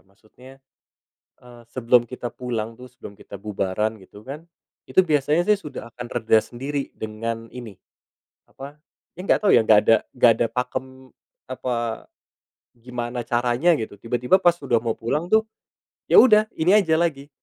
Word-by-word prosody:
Maksudnya, 115 +7 -19 0.8
eee, 120 -1 -15
sebelum 120 0 +3
kita 125 -2 -6
pulang 115 -3 -4
tuh, 125 +1 -13
sebelum 115 -4 -12
kita 100 0 -11
bubaran 105 +1 -2
gitu, 105 +3 -16
kan, 145 +5 -8 0.5
itu - - +3
biasanya 150 +2 +1
sih, 210 - +4
sudah 145 - -9
akan 120 -1 -7
reda 110 -2 +2
sendiri 140 +3 -5
dengan 115 +1 -5
ini 115 -6 -9 0.7
apa, 140 +2 -11 0.4
ya - - -9
enggak - - +2
tahu 200 - +5
ya, - - +6
nggak 110 -1 +6
ada 115 - +6 0.2
nggak 125 -2 +5
ada 115 - +3
pakem, 130 +1 -5 0.4
apa, 120 -3 -3 0.7
gimana 120 0 -5
caranya, 120 +8 +1
gitu. 110 - -6
Tiba-tiba 120 - 0
pas 175 -1 +5
sudah 120 -6 0
mau 115 -2 -2
pulang 150 +9 -2
tuh, 220 0 +3 0.7
ya - - +9
udah 215 -3 +6
ini 180 +5 +4
aja 170 -7 +3
lagi, 145 -5 -1
125 Hz, 155 wpm, -23 LUFS, 115-140 Hz, 0.8 s, ya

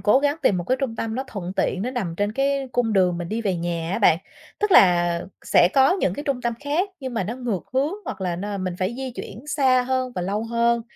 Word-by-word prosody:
cố 215 +5 +4
gắng 290 +2 +1
tìm 190 - +3
một 175 - -3
cái 255 +8 +1
trung 235 -4 -2
tâm 220 0 -3
nó 265 +3 -2
thuận 190 -7 -6
tiện, 190 0 0
nó 245 - -2
nằm 205 -10 -3
trên 205 +1 0
cái 275 +1 0
cung 230 -3 +1
đường 180 -3 +2
mình 175 -1 -5
đi 220 +2 -2
về 190 -4 0
nhà 170 -1 -3
á - - 0
bạn. 170 -6 +5 0.4
Tức 420 0 0
là 175 - +5 0.2
sẽ 175 - +5
có 270 +5 +6
những 185 - +1
cái 290 - -5
trung 270 -4 -1
tâm 235 -1 0
khác 305 +7 0
nhưng 260 -2 -5
mà 210 -5 0
nó 225 - -3
ngược 235 -8 -2
hướng 280 +6 +1
hoặc - - -6
là 180 -2 -1
n 200 0 -4
mình 185 -1 -2
phải 185 +5 -1
di 265 -1 -4
chuyển 240 +2 -9
xa 265 -4 +3
hơn 255 0 -1
và 180 - -3
lâu 205 +4 -2
hơn. 235 0 +1
225 Hz, 265 wpm, -23 LUFS, 185-260 Hz, 0.4 s, có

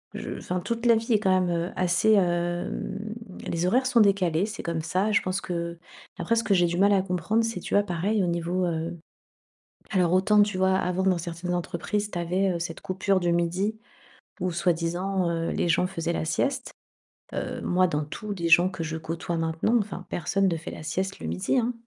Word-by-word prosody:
Je - - -5
enfin, 180 - -3
toute 230 +5 -3
la 235 -1 +6
vie 225 +1 0
est 215 - +4
quand 195 -2 +2
même, 180 - 0
heu, 170 +1 -1
assez 185 +4 +2
hem, 175 0 0 0.5
les 170 +1 -1
horaires 255 +7 +2
sont 250 -2 +3
décalés 190 -4 +3
c'est 220 - -6
comme 165 -1 -2
ça 185 +6 0
je 215 - +3
pense 185 +1 -2
qu'après 170 +5 -4
ce 230 - +1
que 205 - +2
j'ai 175 -1 +4
du 170 +1 -2
mal 200 +2 +5
à 195 - +4
comprendre 190 +5 0
c'est, 225 -4 -2
tu - - -6
vois, 205 - +5
pareil, 195 +3 0
au - - 0
niveau 175 +2 0
heu, 165 +1 -3 0.9
alors 180 -4 +2
autant 205 +3 +5
tu 205 -2 0
vois 190 0 +3
avant 185 0 0
dans 185 -2 +3
certaines 170 +1 -4
entreprises 190 +4 -2
tu 175 - -4
avais, 180 +3 +1
heu, - - -2
cette 165 -1 -5
coupure 190 +1 0
du 175 -1 +1
midi 180 +6 0 0.6
ou 180 0 0
soi-disant, 175 +2 0
heu, 165 0 -1
les 175 - 0
gens 170 +2 +3
faisaient 170 -2 -3
la 160 - -2
sieste. 265 - -1 0.6
Heu, - - -3
moi 185 +1 +2
dans 150 -2 -1
tous 210 +7 -5
les 170 -4 -2
gens 175 +2 +6
que 180 -3 -5
je 160 0 -3
côtoie 165 +1 -4
maintenant, 165 +8 +1
enfin, 195 -3 -5
personne 195 +3 0
ne 170 - 0
fait 160 - -7
la - - -8
sieste 190 +5 -2
le - - -7
midi, 85 - 0
hein, 245 +1 0
180 Hz, 210 wpm, -26 LUFS, 170-200 Hz, 0.9 s, la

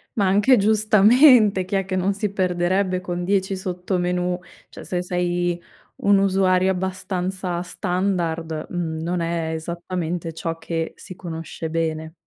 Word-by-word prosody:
Ma 205 - +2
anche 205 +7 +4
giustamente, 215 +1 +5
chi 185 +2 -4
è 195 -1 +1
che 190 0 -3
non 185 +2 +1
si 205 -1 -2
perderebbe 185 0 0
con 175 -1 -4
10 195 +1 0
sottomenù? 180 -1 -2 0.3
Cioè, - - -11
se 180 -1 -2
sei 175 -1 -1 0.4
un 200 0 +4
usuario 190 -1 +3
abbastanza 185 -1 -3
standard, 175 -4 -2
mhmm, 160 -3 -3
non 175 +1 -1
è 165 -1 -2
esattamente 170 0 -4
ciò 165 0 -4
che 165 0 -3
si 185 - -10
conosce 165 -2 -6
bene. 160 -1 -2
180 Hz, 135 wpm, -22 LUFS, 170-195 Hz, 0.4 s, giustamente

